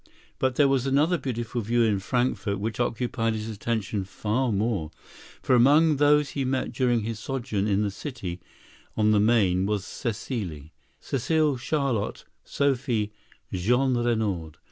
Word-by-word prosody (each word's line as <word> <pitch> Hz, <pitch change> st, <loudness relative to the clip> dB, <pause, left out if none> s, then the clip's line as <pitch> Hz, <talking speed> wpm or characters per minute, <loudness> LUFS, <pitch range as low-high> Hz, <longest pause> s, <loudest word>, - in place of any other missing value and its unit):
But 130 Hz, -1 st, +1 dB
there 145 Hz, 0 st, +5 dB
was 135 Hz, -1 st, +1 dB
another 150 Hz, +6 st, +2 dB
beautiful 120 Hz, -2 st, -3 dB
view 120 Hz, +2 st, +2 dB
in 105 Hz, -3 st, +2 dB
Frankfort 115 Hz, -1 st, -1 dB
which 110 Hz, +1 st, -3 dB
occupied 115 Hz, -1 st, -1 dB
his 110 Hz, 0 st, -4 dB
attention 110 Hz, -2 st, -2 dB
far 110 Hz, +6 st, -1 dB
more, 100 Hz, -6 st, -1 dB, 0.5 s
for -, -, +2 dB
among 145 Hz, +5 st, +5 dB
those 145 Hz, 0 st, +4 dB
he 140 Hz, -, -2 dB
met 130 Hz, 0 st, -1 dB
during 120 Hz, -3 st, +2 dB
his 110 Hz, 0 st, -4 dB
sojourn 120 Hz, -5 st, -2 dB
in 100 Hz, 0 st, +2 dB
the 100 Hz, -, -1 dB
city 100 Hz, -, -6 dB, 0.6 s
on 110 Hz, -1 st, +3 dB
the 105 Hz, -, +4 dB
Main 100 Hz, -4 st, +3 dB
was 105 Hz, -2 st, -1 dB
Cécile,—Cécile 120 Hz, -, -3 dB
Charlotte 135 Hz, -5 st, -1 dB, 0.2 s
Sophie 125 Hz, -6 st, 0 dB, 0.4 s
Jeanrenaud. 110 Hz, -, 0 dB
115 Hz, 135 wpm, -26 LUFS, 105-130 Hz, 0.6 s, there